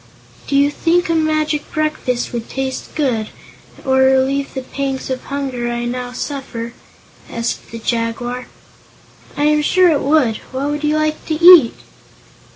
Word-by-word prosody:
"Do 280 - -1
you 285 +1 +4
think 335 +3 +1
a - - +2
magic 310 -1 0
breakfast 305 -6 -2
would 235 -1 -4
taste 265 -1 -4
good, 245 -8 0 0.6
or 265 -1 +2
relieve 265 +2 +2
the 265 - -3
pangs 270 0 -4
of 255 - -4
hunger 265 -4 -3
I 240 0 -3
now 245 0 -4
suffer?" 250 -3 -5 0.6
asked 235 0 -4
the 230 - -7
Jaguar. 240 +2 -3 0.9
"I 290 - 0
am 300 0 +3
sure 365 +4 +4
it 295 -4 +2
would. 275 -6 +2
What 275 +3 -2
would 295 0 -3
you 300 0 +2
like 310 0 -1
to 315 - 0
eat?" 335 -6 +8
270 Hz, 155 wpm, -18 LUFS, 245-305 Hz, 0.9 s, eat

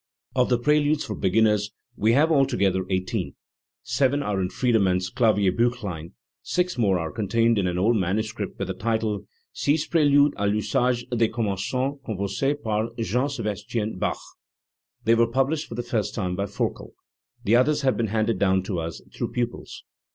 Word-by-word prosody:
Of 125 -1 +2
the 125 - +3
preludes 150 +3 +2
for - - -4
beginners 105 +1 +2 0.3
we 110 +2 +2
have 155 +5 +4
altogether 100 - +2
eighteen.* 95 -1 -2 0.5
Seven 140 +1 +1
are 100 -5 -1
in 90 - -1
Friedemann's 95 -7 +1
Klavierbiichlein; 105 -5 +1 0.3
six 180 0 -1
more 100 -6 +2
are 80 -2 -3
contained 115 +1 +1
in 95 - +1
an 90 0 -2
old 110 +6 +3
manuscript 105 +3 -2
with 95 - -3
the - - -1
title, 110 -2 -2 0.3
Six 150 +2 +1
PrSludes 145 -3 +4
a 100 0 0
Pusage 120 +4 0
des 115 -1 +3
Commengants 100 -4 -2 0.3
composes 110 +6 -1
par 110 0 0
Jean 115 +4 0
S&bastien 110 -5 -3
Bach: - - 0 0.9
they 115 - +4
were 115 0 +4
published 135 +6 0
for 115 - -7
the 120 - -3
first 115 -4 -2
time 90 -4 -2
by 100 +2 -1
Forkel. 100 - -3 0.5
The 110 - +3
others 150 +5 +3
have 130 -1 +3
been 115 - 0
handed 110 -1 0
down 95 -1 +2
to 95 -3 -3
us 80 -1 -5
through - - -3
pupils. 120 -1 -4
110 Hz, 165 wpm, -25 LUFS, 100-125 Hz, 0.9 s, have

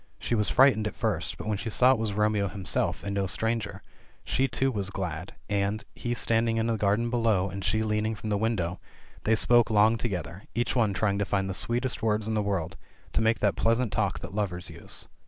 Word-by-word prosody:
She - - -3
was 105 -2 +2
frightened 120 -5 +5
at - - -6
first, - - -2
but - - -7
when 105 -2 -1
she 115 - -3
saw 125 +4 +5
it 130 - +2
was 110 -2 -1
Romeo 105 -1 +1
him 95 -1 -7
self, - - -1
and 100 - -3
no 100 -1 0
stranger, 110 +4 -2 0.4
she 135 +1 +1
too 135 0 0
was 100 -5 -1
glad, 90 -3 -5
and, 100 +1 -1
he 120 0 -3
standing 115 0 +1
in 110 - +1
the 115 -1 +1
gar 100 -1 +2
den 120 +1 -2
below 110 -6 +1
and 95 +1 -5
she 110 +3 +1
leaning 110 +1 0
from 105 +1 -5
the - - +2
window, 95 -6 -1 0.5
they 110 - +4
spoke 120 +1 +4
long 110 +1 +4
to 120 - -1
gether, 90 -1 -5
each 120 +2 0
one 110 -5 +2
trying 100 -1 +1
to - - +2
find 95 -1 0
the 95 - -3
sweetest 120 +6 -2
words 110 -1 +1
in 110 - -1
the 105 - +1
world, 95 -3 -2 0.4
to - - +2
make 110 +1 +2
that 100 -2 +2
pleasant 115 -1 +1
talk - - 0
that - - -8
lovers 95 -4 -3
use. - - -9
105 Hz, 230 wpm, -28 LUFS, 100-115 Hz, 0.5 s, frightened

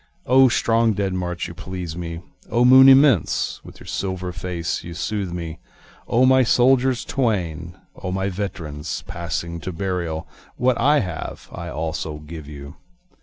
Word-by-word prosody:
O 130 +1 +6
strong 115 -1 +2
dead 100 -1 -1
march 90 -1 -3
you 85 - -8
please 90 -1 -6
me! 85 -1 -5 0.3
O 120 +1 +3
moon 130 +1 +9
immense 135 - +4
with - - -13
your - - -13
silvery 95 -2 -3
face 90 -2 -3
you 85 0 -8
soothe 100 0 -3
me! 85 -2 -6 0.5
O 125 +2 +3
my 130 0 +5
soldiers 130 +1 +3
twain! 90 - -2 0.2
O 90 - -3
my 95 +1 -1
veterans 85 -6 -5
passing 85 0 -4
to 95 - -5
burial! 85 -3 -3 0.3
What 125 -1 +2
I 145 +4 +4
have 90 -4 -6
I - - -6
also 80 -1 -4
give 75 0 -9
you. 70 -1 -10
90 Hz, 155 wpm, -22 LUFS, 85-115 Hz, 0.5 s, moon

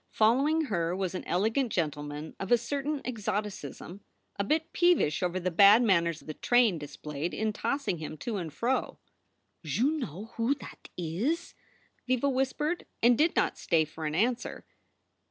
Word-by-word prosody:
Following 270 +9 +3
her 175 - -1
was 190 -1 -2
an 185 - -4
elegant 225 +7 +1
gentleman 150 -1 -3
of 195 - -5
a 240 - +7
certain 280 +4 -3
exoticism, 205 - -4 0.3
a 200 - -1
bit 315 +9 0
peevish 345 - +3
over 180 0 0
the 185 0 -1
bad 200 +7 +7
manners 170 -6 +2
the 155 - -7
train 235 -3 +3
displayed 150 +2 -5
in 220 0 -1
tossing 275 - -2
him 155 0 -6
to 220 +6 -3
and 170 -4 -4
fro. 240 - -1 0.7
"Joo 220 - +1
know 225 - -5
who 235 +5 +2
that 265 - -12
is?" 200 - -2 0.5
Viva 255 +2 +2
whispered, 270 +5 -1 0.2
and 240 +1 +6
did 315 +7 +2
not - - +1
stay 160 -3 +2
for 155 +1 -6
an 150 - -3
answer. 240 +6 -1
210 Hz, 155 wpm, -29 LUFS, 170-255 Hz, 0.7 s, a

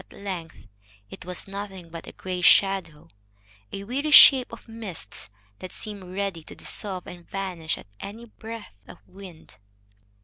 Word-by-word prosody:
At - - -16
length 180 -5 -7 0.5
it - - -10
was 180 +1 -2
nothing 195 -3 -7
but 165 0 -8
a - - -7
gray 185 -1 -5
shadow, 190 -5 +4 0.6
a 195 - -5
weary 270 +8 -2
shape 270 -3 +9
of 230 - -11
mist 205 - -7 0.3
that 185 - -7
seemed 195 -4 -5
ready 195 -5 -2
to - - -8
dissolve 190 -3 -2
and 175 -1 -11
vanish 180 -5 -2
at - - -12
any 220 +4 -8
breath 225 - -10
of - - -11
wind. 185 -4 -12
195 Hz, 150 wpm, -26 LUFS, 180-210 Hz, 0.6 s, shape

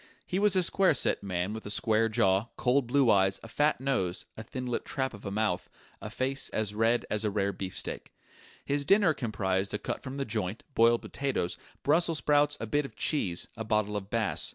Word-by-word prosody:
He 185 - -1
was 205 -1 +4
a 185 - +4
square 185 -2 +3
set - - +1
man 95 0 -2
with 110 - -6
a - - -7
square 110 +1 +2
jaw, 110 -2 +2
cold 125 0 +2
blue 130 -2 +4
eyes, 95 -1 +3
a - - -8
fat 145 +6 +1
nose, 125 -10 -1
a - - -7
thin 125 +3 -6
lipped 120 -1 -3
trap 130 -2 -2
of 105 -2 -9
a - - -3
mouth, 105 -3 -1 0.3
a 105 - -6
face 130 +4 -2
as 105 -2 -1
red 115 +3 +2
as 105 0 0
rare 100 -1 0
beefsteak. 95 0 -5 0.5
His 140 0 0
dinner 195 +1 +4
comprised 100 -6 -1
a - - +1
cut - - -4
from 135 0 -7
the 140 - -2
joint, 105 -2 -3
boiled 115 0 +4
potatoes, 135 -11 -2 0.3
brussels 165 +2 +3
sprouts, 145 +1 +2
a - - -3
bit 145 +7 0
of 135 - -9
cheese, 95 - 0
a 110 - -5
bottle 105 -1 0
of 100 -1 -4
Bass. 115 -2 0
115 Hz, 205 wpm, -29 LUFS, 105-140 Hz, 0.5 s, was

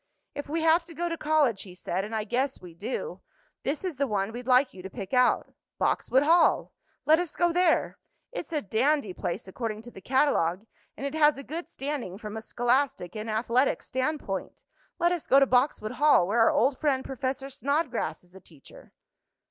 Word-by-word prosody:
"If 285 0 -6
we 325 +2 -1
have 325 +2 +4
to 335 -1 -12
go 345 +2 -2
to 335 - -2
college," 300 -10 +2
he 180 -3 -11
said, 185 +1 -3
"and 215 +2 -5
I 215 - -1
guess 260 +5 -1
we 175 -2 -12
do, 235 - -5 0.4
this 285 +5 -2
is 360 -7 -3
the 280 +1 +1
one 200 -2 -1
we'd 245 +2 -8
like 255 +1 +4
you 185 - -10
to 190 - -7
pick 195 +2 -8
out 250 0 +3 0.2
Boxwood 265 +2 +2
Hall! 330 +2 +3 0.3
Let 315 +2 +5
us 350 -3 -3
go 345 -1 +2
there! 355 -1 +2 0.3
It's - - -6
a 305 -3 -1
dandy 225 +2 +1
place, 175 - -4
according 215 +2 -5
to 240 - -11
the 190 - -12
catalogue, 220 - +1 0.3
and 275 - -5
it 280 - -3
has 300 -2 +4
a 275 - -7
good 320 +6 -6
standing 270 -10 -4
from 210 0 -7
a 220 - -4
scholastic 245 -6 0
and 215 +1 -5
athletic 235 +4 +1
standpoint. 260 -6 -3 0.3
Let 345 0 +2
us 350 -3 -2
go 270 - +6
to 275 - +5
Boxwood 250 -4 +1
Hall, 290 -8 +4
where 220 +4 +1
our 225 - +6
old 260 +2 +2
friend, 275 -4 +1
Professor 270 +1 -3
Snodgrass, 280 - -1
is 180 0 -23
a 190 - -12
teacher." 155 -6 -17
260 Hz, 200 wpm, -27 LUFS, 215-300 Hz, 0.4 s, go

